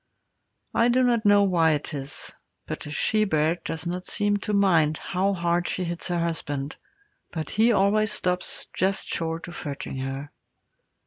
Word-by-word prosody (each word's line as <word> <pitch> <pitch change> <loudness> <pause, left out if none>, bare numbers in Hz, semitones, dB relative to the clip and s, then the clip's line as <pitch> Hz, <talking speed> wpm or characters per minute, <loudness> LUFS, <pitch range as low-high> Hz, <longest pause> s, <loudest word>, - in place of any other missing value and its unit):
I 230 +1 +4
do 255 +1 +3
not 235 -3 +2
know 205 0 +6
why 170 -5 +3
it 150 +1 -3
is, 140 0 -6 0.3
but - - -5
a - - -6
she 215 +8 +1
bear 160 -3 +2
does 160 0 -4
not 180 +1 -3
seem 205 +1 +1
to 205 - -4
mind 170 -7 +3
how 195 +2 0
hard 175 0 0
she 185 - -2
hits 170 -1 -3
her 175 -1 0
husband, 150 -4 -2 0.5
but 160 -3 -5
he 225 +3 +4
always 210 +1 +3
stops 180 0 -1
just 190 +1 0
short 165 +1 -3
of 175 - -7
hurting 140 -2 -5
her. 135 +2 -4
175 Hz, 170 wpm, -25 LUFS, 155-200 Hz, 0.5 s, know